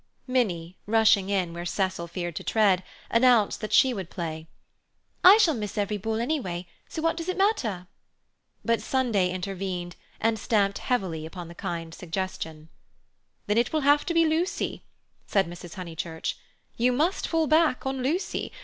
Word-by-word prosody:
Minnie, 185 -9 -1
rushing 220 -3 +4
in 185 -4 0
where 170 0 -5
Cecil 185 -1 -1
feared 175 -1 -4
to - - -5
tread, 200 -5 +3 0.3
announced 230 -4 +4
that 215 - -4
she 260 -1 +5
would 190 -6 -5
play. 160 -2 -5 0.8
"I 385 +3 +10
shall 350 -8 +4
miss 210 -5 -5
every 205 0 0
ball 220 +2 -2
anyway, 230 - -2 0.2
so 320 - -5
what 330 0 +2
does 335 +1 -5
it 370 - -2
matter?" 255 - +1 0.8
But 230 -1 +2
Sunday 230 -9 +1
intervened 185 -1 -4 0.2
and 225 0 +1
stamped 200 -3 +1
heavily 185 -11 -1
upon 170 +1 -8
the - - -9
kindly 165 -1 -5
suggestion. 165 -3 -5 0.8
"Then 210 +2 +2
it 240 - +1
will 310 - +1
have 290 +1 +4
to 340 - 0
be 330 0 +5
Lucy," 325 +4 -1 0.5
said 195 -4 +2
Mrs. 175 +1 -9
Honeychurch; 165 -3 -4 0.4
"you 245 +2 +3
must 315 +9 +1
fall 325 -1 +1
back 310 -4 +3
on 265 -1 -2
Lucy. 315 +9 -1
205 Hz, 160 wpm, -26 LUFS, 175-260 Hz, 0.8 s, I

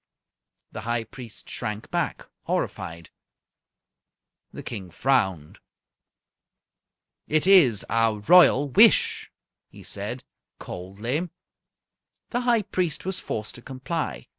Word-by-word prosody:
The - - -7
High 115 0 -1
Priest 115 0 -11
shrank 105 0 -5
back, - - -2 0.2
horrified. 85 0 -4 1.4
The - - -9
King 100 -6 -7
frowned. 95 - 0 1.7
"It 155 +2 +2
is 165 - +6
our 115 -1 +1
Royal 145 -1 +6
wish," 125 - +4 0.4
he - - -14
said, - - -6 0.3
coldly. 110 - -4 1.0
The 245 - 0
High 240 -3 +2
Priest 180 -6 -2
was 190 -1 -3
forced 110 0 -5
to 120 - -10
comply. 130 - -4
120 Hz, 100 wpm, -25 LUFS, 105-165 Hz, 1.7 s, is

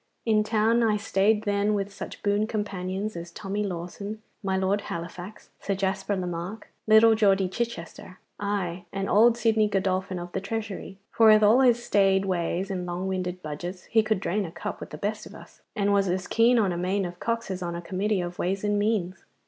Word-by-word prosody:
In 215 -2 +3
town 220 +2 +2
I 220 -2 +3
stayed 210 +1 +2
then 205 0 +1
with 200 0 -3
such 195 -1 -8
boon 205 +1 +1
companions 200 -1 -3
as 170 0 -6
Tommy 200 +3 -4
Lawson, 200 +3 -5 0.2
my 190 -2 0
Lord 190 +2 +1
Halifax, 175 +2 -7
Sir 200 - -2
Jasper 195 +1 -1
Lemarck, 180 +3 -5 0.2
little 220 +1 +7
Geordie 195 -3 +3
Chichester, 185 -3 -5 0.2
aye, 190 -4 -2
and 195 0 -3
old 230 +3 +5
Sidney 220 -2 +3
Godolphin 190 -1 -1
of 175 0 -7
the 190 - -3
Treasury; 200 -2 -5
for 225 - +5
with 215 0 +7
all 215 +5 +6
his 240 -2 +4
staid 195 -1 +3
ways 185 +1 -1
and 180 -2 -3
long 175 +2 -3
winded 185 -1 -3
budgets 175 +5 -6
he 225 - +5
could 215 -2 0
drain 200 +2 -1
a 170 - -6
cup - - -6
with - - -8
the - - -8
best - - -3
of - - -13
us, - - -15
and 200 -2 +1
was 200 -1 +3
as 185 +1 -1
keen 235 +2 +4
on 205 -5 +2
a 175 - -3
main 190 +2 0
of 175 0 -7
cocks 230 -2 -2
as 185 0 -4
on 170 -1 -3
a - - -4
committee 195 +2 -1
of 175 0 -6
ways 190 +2 -1
and 205 0 +1
means. 205 -4 -1
195 Hz, 205 wpm, -26 LUFS, 185-215 Hz, 0.2 s, little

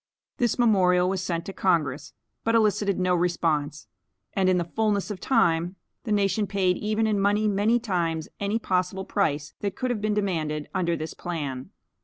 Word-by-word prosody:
This 240 -2 +1
memorial 185 -6 +4
was 190 -1 -1
sent 170 -2 -2
to 195 - -6
Congress, 155 -8 0 0.3
but 230 0 +2
elicited 210 -3 +2
no 185 0 +2
response; 160 -4 0 0.5
and 190 -1 +2
in 185 - +3
the 175 - +1
fulness 210 +3 -1
of 195 - -5
time, 175 -7 +2 0.3
the 220 - -3
nation 205 0 +1
paid 190 -2 +1
even 215 +1 0
in 215 -2 +1
money 205 +2 +2
many 210 +4 +2
times 170 -8 -1
any 200 +2 0
possible 190 -2 -1
price 150 -8 -1
that 200 -2 -3
could 255 -1 -1
have 220 -4 -2
been 210 0 0
demanded 155 -7 -1
under 175 -3 0
this 155 0 -5
plan. 145 -5 -5
190 Hz, 175 wpm, -26 LUFS, 170-210 Hz, 0.5 s, memorial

